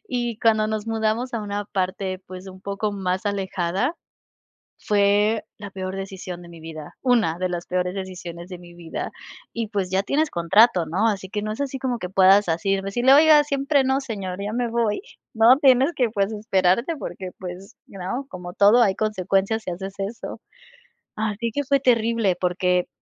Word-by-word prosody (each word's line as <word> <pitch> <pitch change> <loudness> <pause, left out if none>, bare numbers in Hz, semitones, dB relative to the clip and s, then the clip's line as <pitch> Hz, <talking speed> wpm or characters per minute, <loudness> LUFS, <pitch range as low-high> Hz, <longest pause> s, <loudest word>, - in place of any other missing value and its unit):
Y 240 -3 -2
cuando 220 -2 +3
nos 215 0 -3
mudamos 225 +2 -1
a 230 - -1
una 205 0 -4
parte 185 -1 -2
pues 185 +1 -9
un 185 0 -12
poco 205 +1 -2
más 190 0 -2
alejada, 195 - -1 0.9
fue 205 +1 +2 0.2
la 205 -1 -8
peor 190 0 -5
decisión 190 -2 -6
de 170 - -12
mi 170 -1 -12
vida, 155 -2 -9
una 235 -10 +2
de 185 - 0
las 175 -1 -4
peores 180 0 -1
decisiones 180 -2 -7
de 180 -2 -8
mi 175 -1 -14
vida. 170 -2 -6 0.4
Y, 230 -1 -3
pues, 200 -3 -2
ya 190 +1 +1
tienes 300 +8 +1
contrato, 180 +1 +4
¿no?, 190 +8 +1
así 190 -3 -2
que 210 +1 -3
no 215 - -3
es 215 +6 -5
así 270 -1 -2
como 250 -2 -1
que 180 - -5
puedas 195 +1 +5
así 170 +4 +1
decirle: 240 +7 +2
"Oiga, 300 +1 +7
siempre 280 0 +1
no, 265 +1 +1
señor, 200 -8 -5
ya 205 +1 -3
me 245 0 -1
voy", 230 -3 0 0.3
¿no? 230 +4 +6
Tienes 270 +2 +4
que, 245 -3 +2
pues, 200 0 0
esperarte 210 - +1
porque 190 -9 -6
pues, 185 +1 -8
¿you 195 - -12
know?, 240 +10 -4
como 180 -4 -8
todo, 205 +6 +5
hay 200 -4 +3
consecuencias 210 +1 0
si - - -4
haces 190 +2 -6
eso. 200 +4 -5 0.8
Así 220 +2 -2
que 285 - -1
fue 275 +1 +2
terrible 230 -6 +2
porque 180 0 +1
200 Hz, 185 wpm, -23 LUFS, 185-230 Hz, 0.9 s, Oiga